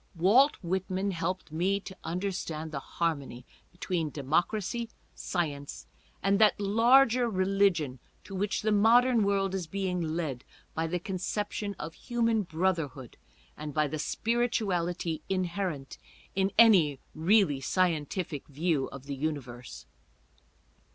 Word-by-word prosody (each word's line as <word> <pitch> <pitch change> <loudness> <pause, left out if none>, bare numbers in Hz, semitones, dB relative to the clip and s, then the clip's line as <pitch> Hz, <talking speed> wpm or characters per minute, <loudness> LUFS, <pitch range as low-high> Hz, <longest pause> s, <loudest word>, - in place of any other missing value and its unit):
Walt 220 - +5
Whitman 190 +2 -1
helped 175 -1 -3
me 185 +5 +1
to 190 - -9
understand 165 -3 -3
the 140 - -3
harmony 140 -6 -3 0.3
between 175 -2 -2
democracy, 175 - -1 0.2
science, 145 -6 -4 0.4
and 195 +1 +3
that 215 -2 +5
larger 235 +4 +4
religion 185 - +1 0.2
to 195 - -11
which 200 +3 -1
the 215 - +2
modern 230 +3 +5
world 195 -1 +1
is 185 -4 -3
being 185 0 -2
led 155 -6 -3 0.3
by 160 +1 -1
the 180 +2 -1
conception 200 +3 -3
of 160 +2 -6
human 230 0 0
brotherhood 165 - -2 0.4
and 150 -2 -7
by 155 0 +3
the 155 +2 -4
spirituality 180 -6 -1
inherent 180 -6 -2 0.3
in 195 +1 +1
any 180 -12 +6 0.2
really 165 -4 +3
scientific 165 -1 -1
view 150 -1 0
of 135 -1 -10
the 140 -1 -4
universe. 130 -5 -5
180 Hz, 120 wpm, -29 LUFS, 155-200 Hz, 0.4 s, any